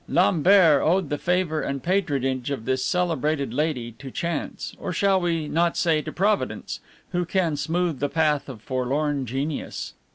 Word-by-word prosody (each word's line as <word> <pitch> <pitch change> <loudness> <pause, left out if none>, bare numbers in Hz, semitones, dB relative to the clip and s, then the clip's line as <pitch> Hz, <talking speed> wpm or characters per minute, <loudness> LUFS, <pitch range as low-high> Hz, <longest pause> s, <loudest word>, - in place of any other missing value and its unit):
Lambert 175 -3 +5
owed 175 -1 +2
the 145 - -1
favor 180 -3 0
and 140 -2 -3
patronage 140 -9 0
of 135 -6 -4
this 130 0 0
celebrated 155 - 0
lady 135 -5 -1
to 135 - -7
chance, 170 +3 -4
or - - -4
shall 195 +1 +2
we 165 -3 0
not 170 +2 +1
say 160 -3 +2
to 155 - -6
Providence, 205 +5 -1 0.3
who 180 0 0
can 175 -3 0
smooth 165 0 -1
the 145 - 0
path 150 -3 +1
of 110 -5 -9
forlorn 135 +2 -1
genius? 135 +5 -4
155 Hz, 160 wpm, -24 LUFS, 140-175 Hz, 0.3 s, Lambert